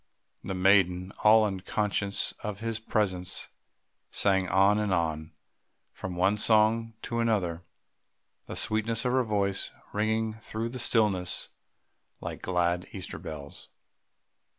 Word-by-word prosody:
The 95 - -3
maiden, 95 -1 +3
all 110 +1 +7
unconscious 100 +1 0
of 105 -2 -4
his 115 0 -2
presence, 95 -5 -1 0.6
sang 95 -2 +1
on 100 +2 +4
and 105 -2 0
on, 80 -3 -1 0.6
from 95 -2 -6
one 95 +4 +2
song 110 +1 +3
to 115 - -2
another, 100 -8 0 0.9
the - - -6
sweetness 110 +2 0
of 125 - +2
her 130 +1 +3
voice 100 -3 0 0.2
ringing 110 +1 0
through 110 +1 -5
the 130 +1 -6
stillness 100 -7 +1 0.7
like - - -6
glad 90 0 0
Easter 95 -4 -6
bells. 70 -2 -6
100 Hz, 120 wpm, -28 LUFS, 90-110 Hz, 0.9 s, all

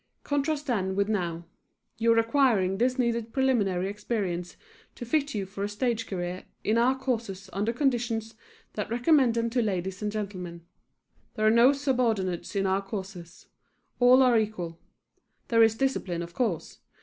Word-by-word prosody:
Contrast 290 +1 -1
then 190 -8 -1
with 200 0 +1
now. 175 -5 -2 0.5
You 230 0 +3
are - - +1
acquiring 225 -6 +2
this 250 +2 +2
needed 235 -2 0
preliminary 210 -9 +1
experience 195 -4 -3 0.4
to 240 - -7
fit 285 +2 0
you 200 -2 -2
for 195 +1 -6
a 205 - -1
stage 225 +1 -1
career 180 -1 -4 0.2
in 220 +2 +2
our 255 +3 +3
courses 220 -7 -3
under 205 +4 0
conditions 235 -4 -1 0.4
that 210 - -4
recommend 245 0 +3
them 230 0 0
to 245 0 +1
ladies 190 -2 -2
and 210 0 -1
gentlemen. 185 -5 -6 0.7
There 215 -2 0
are 215 - +6
no 235 +4 +6
subordinates 235 - -1
in 195 -1 +1
our 190 +1 +1
courses. 190 -3 -8 0.5
All 250 +1 +7
are 245 -3 +5
equal. 180 -6 -4 0.7
There 230 -1 +4
is 225 -1 +5
discipline, 200 -10 -1
of 170 0 -10
course. 210 -9 -2
220 Hz, 160 wpm, -27 LUFS, 190-245 Hz, 0.7 s, All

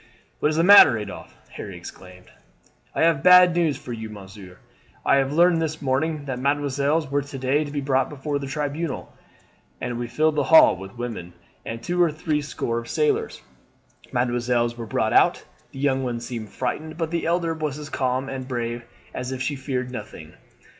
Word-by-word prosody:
"What 150 - +2
is 155 - -1
the 165 - +2
matter, 175 - +8
Adolphe?" 105 -2 -8 0.2
Harry 100 -4 -7
exclaimed. 90 +1 -13 0.6
"I - - +2
have 165 -4 +3
bad 180 0 +7
news 165 -4 +1
for 120 - -8
you, 110 -1 -6
monsieur. 95 -3 -12 0.5
I 140 - +4
learned 165 +5 +3
this 155 0 -2
morning 145 +2 -1
that 130 -3 -4
mesdemoiselles 140 +2 0
were 145 0 +1
to 140 0 -8
day 135 +3 +1
to 145 - -7
be 145 0 -3
brought 135 -1 +1
before 145 0 -3
the 140 - -6
Tribunal, 145 +2 -4 0.7
and 120 -1 -4
we 120 - -3
filled 155 +4 +1
the - - +2
hall 160 - +7
with 95 +4 -11
women 115 -8 -6 0.3
and 115 0 -6
two 175 +4 0
or 170 -2 +4
three 155 -1 -1
score 115 -5 -3
of 115 - -10
sailors. 450 0 0 0.7
Mesdemoiselles 120 -1 0
were 115 -1 -7
brought - - 0
out. - - +3 0.3
The - - -12
young 135 -1 +1
one 120 -2 -2
seemed 115 -3 -6
frightened, 155 +8 -4
but 165 -1 -2
the 170 -1 -1
elder 170 -1 0
was 155 -3 -3
as 150 -1 -8
calm 130 0 -1
and 130 -1 -6
brave 120 -1 -3 0.3
as 125 +1 -4
if 130 - -4
she 145 +2 -2
feared 130 -2 -3
nothing. 125 - -9
135 Hz, 190 wpm, -23 LUFS, 120-155 Hz, 0.7 s, matter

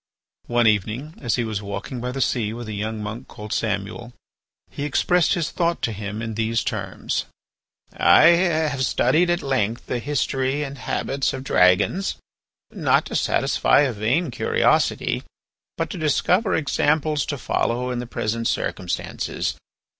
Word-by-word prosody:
One 120 0 +2
evening 110 +8 +1
as 120 -5 0
he 120 - 0
was 110 -3 -3
walking 100 +5 -5
by 125 +1 -3
the 135 +1 -3
sea 110 -4 0
with 120 0 -7
a 110 - -5
young 105 +1 -3
monk 110 +5 -6
called 105 +1 -7
Samuel, 110 +3 -3 0.6
he - - -7
expressed 170 +4 +2
his 170 -4 -2
thought 170 -1 -1
to 115 - +1
him 105 +1 -5
in 115 0 -4
these 115 +1 0
terms: - - -3 0.7
"I - - +6
have 160 -6 +2
studied 150 +7 +2
at 175 0 0
length 120 -4 -1
the 120 - -2
history 135 +1 -1
and 140 -1 -7
habits 135 0 -1
of 130 -1 -5
dragons, 90 - +3 0.6
not - - +2
to - - -6
satisfy - - +3
a 135 -4 +1
vain 125 +9 0
curiosity, - - +1 0.6
but - - -2
to - - -5
discover 180 +7 +2
examples 150 0 +1
to 145 - -2
follow 125 0 -1
in 125 - -2
the 120 - -5
present 115 0 -2
circumstances. - - -2
125 Hz, 155 wpm, -23 LUFS, 110-145 Hz, 0.7 s, I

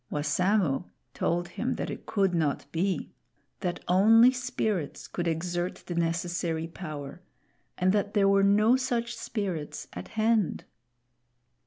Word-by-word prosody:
Wassamo 175 +2 +1 0.2
told 175 +1 0
him - - -2
that - - -3
it - - -8
could 195 -3 +1
not 155 -4 0
be; 185 +3 -1 0.5
that 180 -3 -3
only 225 +7 +6
spirits 220 - -2
could 175 -1 -3
exert 175 +2 -1
the 175 - -4
necessary 170 -1 -1
power, 155 -2 -7 0.6
and 185 +1 +3
that 205 0 0
there 200 -1 +4
were 195 0 +4
no 210 +4 +5
such 240 -2 -1
spirits 185 -9 -4
at - - -7
hand. 220 -3 +2
185 Hz, 130 wpm, -28 LUFS, 170-210 Hz, 0.6 s, only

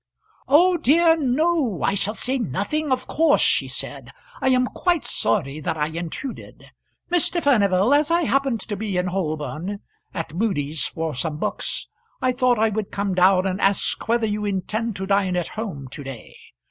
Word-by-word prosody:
"Oh 350 +6 +5
dear, 325 +3 +4
no; 295 - 0
I - - +2
shall 205 +2 0
say 260 +4 0
nothing 240 - -2
of 255 0 0
course," 315 -2 +3
she - - +3
said. - - -7 0.3
"I 265 - +2
am 255 -1 +3
quite 345 +4 0
sorry 150 -7 -1
that 155 - -3
I 150 0 0
intruded. 170 - -7 0.4
Mr. 350 0 +2
Furnival, 210 - +3
as 295 +1 +3
I 340 +1 +2
happened 270 -6 +1
to 205 - -4
be 200 -2 -3
in 180 - +1
Holborn 175 +1 -3 0.3
at 165 -4 -5
Mudie's 160 -7 -1
for 160 -1 -4
some 150 +4 -3
books - - -2 0.3
I 255 - +2
thought 250 -1 +2
I 220 +1 +3
would 215 -1 -3
come 200 -1 -1
down 185 +1 +4
and 190 +1 -2
ask 195 +1 0
whether 235 0 +2
you 210 -1 -2
intend 210 +3 -2
to 190 - -4
dine 195 -2 +1
at 175 -2 -1
home 190 -12 -6
to 145 - -7
day. 135 -5 -9
205 Hz, 175 wpm, -23 LUFS, 180-260 Hz, 0.4 s, Oh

